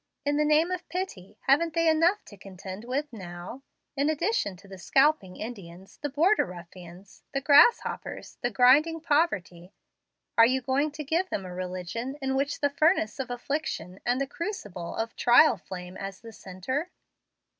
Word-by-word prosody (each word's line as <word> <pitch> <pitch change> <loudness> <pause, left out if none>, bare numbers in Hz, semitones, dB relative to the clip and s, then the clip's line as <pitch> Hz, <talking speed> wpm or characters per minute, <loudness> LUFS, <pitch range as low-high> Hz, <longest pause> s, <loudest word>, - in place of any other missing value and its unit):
In 290 0 +1
the 300 - +3
name 310 +4 +3
of 365 0 -4
pity, 320 - -5
haven't 310 +4 +2
they 330 0 +2
enough 330 +6 +3
to 205 - -13
contend 190 +2 -9
with 275 +3 -3
now? 180 +4 -8 0.3
In 285 +2 +1
addition 315 - 0
to 200 +2 -17
the 190 -1 -11
scalping 270 - +2
Indians, 190 -5 -9
the 290 - -2
border 330 +10 +3
ruffians, 180 +1 -12
the - - +2
grasshoppers, 290 - +3
and 245 - -2
grinding 290 +6 +5
poverty, 195 - 0 0.7
are 230 - +9
you 260 +2 +1
going 265 +4 0
to 300 - -6
give 335 +6 0
them 195 - -3
a 180 - -7
religion 185 - -5
in 265 -1 -2
which 280 +2 -1
the 285 - +3
furnace 285 - +2
of 265 - -3
affliction 245 - -4
and 245 +2 +1
the 275 - 0
crucible 260 - -6
of 225 0 -3
trial 245 +2 +6
flame 180 -1 -9
as 195 -1 -7
the 230 -1 -11
centre? 235 - -4
255 Hz, 165 wpm, -27 LUFS, 190-300 Hz, 0.7 s, are